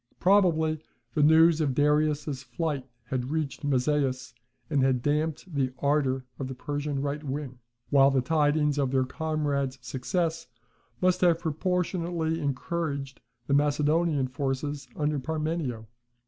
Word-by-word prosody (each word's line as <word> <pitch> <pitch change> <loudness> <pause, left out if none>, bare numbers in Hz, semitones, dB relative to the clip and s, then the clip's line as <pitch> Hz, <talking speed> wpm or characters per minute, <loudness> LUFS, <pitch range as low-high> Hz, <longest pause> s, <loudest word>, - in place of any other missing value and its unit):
Probably 165 -5 +3 0.3
the 150 - +1
news 160 +2 +6
of 140 -4 0
Darius's 150 -1 +1
flight 140 +1 -3 0.2
had 125 +1 -3
reached 155 -2 -3
Mazaeus, 130 -2 0 0.3
and 145 -3 +1
had 130 -2 +2
damped 155 +4 -1
the 130 -3 0
ardour 135 -2 +1
of 135 - -3
the 130 - -6
Persian 145 +1 -3
right 145 +1 -3
wing; 135 -2 -5 0.3
while 135 -1 +6
the 135 -1 +2
tidings 150 +1 +2
of 135 -2 +1
their 130 0 +2
comrades' 140 -2 -2
success 165 +4 -2 0.5
must 185 0 +2
have 175 -2 +5
proportionally 170 0 -1
encouraged 140 -1 -3 0.2
the 140 - 0
Macedonian 150 0 +2
forces 135 +1 -3
under 150 -1 0
Parmenio. 155 -5 -3
145 Hz, 130 wpm, -27 LUFS, 135-160 Hz, 0.5 s, news